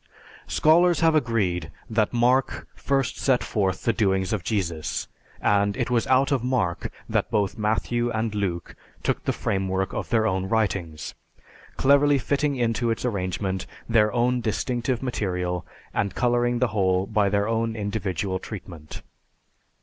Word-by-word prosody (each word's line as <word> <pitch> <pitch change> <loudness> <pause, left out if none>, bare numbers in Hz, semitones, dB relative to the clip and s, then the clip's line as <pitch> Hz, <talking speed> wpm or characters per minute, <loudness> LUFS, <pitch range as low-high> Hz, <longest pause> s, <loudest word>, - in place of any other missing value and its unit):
Scholars 175 +3 +4
have 165 -1 +4
agreed 105 - 0 0.2
that 110 -2 +1
Mark 125 +2 +1
first 135 -3 -1
set 130 -3 +2
forth 95 -4 -1
the 115 - +2
doings 95 -3 +1
of 100 -5 -2
Jesus 85 -8 -2 0.3
and 100 +1 +2
"it 125 -2 -1
was 120 -2 +1
out 130 +2 +3
of 135 -4 +1
Mark 125 -9 -1 0.2
that - - 0
both 100 -3 0
Matthew 120 +2 0
and 110 -1 -1
Luke 95 -5 -3 0.3
took - - -1
the - - 0
framework 95 0 -1
of - - -4
their 115 -2 +2
own 95 -2 0
writings, 95 -8 -1 0.6
cleverly 140 +1 +4
fitting 140 +2 0
into 120 -1 0
its 115 +2 -1
arrangement 95 -3 -2 0.2
their 110 -2 +3
own 125 +1 +1
distinctive 120 +2 -1
material 90 -7 -2 0.3
and 100 -1 -1
coloring 120 0 +2
the 125 0 +1
whole 95 -2 +1
by 105 -1 +1
their 100 +1 +1
own 115 0 0
individual 100 -3 -2
treatment." 85 -8 -9
110 Hz, 145 wpm, -25 LUFS, 95-120 Hz, 0.6 s, Scholars